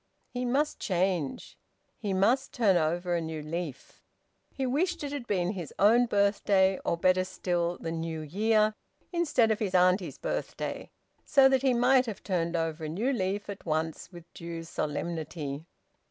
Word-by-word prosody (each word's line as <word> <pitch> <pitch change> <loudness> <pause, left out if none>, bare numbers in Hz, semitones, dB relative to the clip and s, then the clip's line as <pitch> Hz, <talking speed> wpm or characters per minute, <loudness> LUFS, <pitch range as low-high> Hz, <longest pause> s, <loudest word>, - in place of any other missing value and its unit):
He 250 0 -3
must 280 +5 0
change. 180 - -1 0.4
He 205 - -3
must 230 +9 +2
turn 215 -7 +3
over 175 +2 0
a 170 - +1
new 160 -1 -5
leaf. 155 -3 -6 0.5
He 265 - -3
wished 340 +7 0
it 285 - -4
had 280 -5 -5
been 180 -3 0
his 175 -8 -6
own 235 +5 +5
birthday, 200 -2 +2
or, 170 - 0
better 185 +2 +3
still, 175 -2 -2
the 165 - -5
New 165 -1 -3
Year, 215 +7 +2 0.4
instead 295 -10 +2
of 215 - 0
his 195 -4 -1
auntie's 180 +1 +3
birthday, - - -4 0.3
so 275 -3 +5
that 265 -1 +3
he 260 -2 +3
might 250 +1 +4
have 215 -4 -6
turned 170 -3 -1
over 165 -1 -2
a - - -4
new 225 - 0
leaf 200 -2 -2
at 200 -1 -7
once 160 +1 -2
with 175 -2 -11
due 170 -1 -6
solemnity. 160 -2 -4
185 Hz, 165 wpm, -29 LUFS, 165-230 Hz, 0.5 s, own